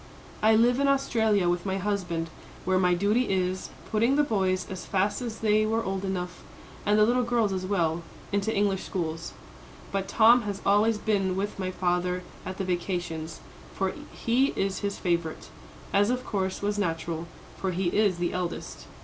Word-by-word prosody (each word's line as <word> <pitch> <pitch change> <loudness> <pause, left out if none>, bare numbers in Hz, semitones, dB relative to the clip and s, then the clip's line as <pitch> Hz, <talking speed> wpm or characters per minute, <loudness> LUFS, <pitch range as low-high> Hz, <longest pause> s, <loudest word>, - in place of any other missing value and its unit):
"I 220 +1 +5
live 240 +3 +4
in 280 - +3
Australia 220 -8 +2
with 175 0 +1
my 190 -1 -1
husband, 180 -5 -2 0.3
where 185 0 +3
my 180 -1 +3
duty 210 +7 +2
is, 185 -1 0 0.2
putting 230 +5 +3
the 295 - +4
boys 190 -8 +1
as 185 -1 -6
fast 200 +4 0
as 230 -2 -5
they 215 -1 +3
were 225 +1 0
old 195 -1 -2
enough, 180 -2 -3 0.5
and 210 +1 +4
the 210 - +6
little 245 +3 +3
girls 235 -4 +1
as 185 0 -3
well, 170 -4 +1 0.3
into 205 +2 +1
English 200 -2 +1
schools. 165 -2 -4 0.6
But 195 -1 -1
Tom 235 +2 +6
has 205 -3 -4
always 210 +2 +4
been 195 -4 0
with 200 +1 -3
my 185 -1 -1
father 180 0 0 0.2
at 185 0 -5
the 195 - -2
vacations, 175 -3 -3 0.3
for 190 -1 0 0.2
he 255 +4 +1
is 195 -1 0
his 200 -1 -2
favourite, 170 -3 -2 0.4
as 205 +2 +4
of 250 +1 -1
course 190 -2 -2
was 205 0 0
natural, 165 -2 -2 0.3
for 190 - -2
he 180 0 0
is 205 -2 +2
the 175 0 -1
eldest. 180 -1 -4
195 Hz, 175 wpm, -27 LUFS, 180-215 Hz, 0.6 s, the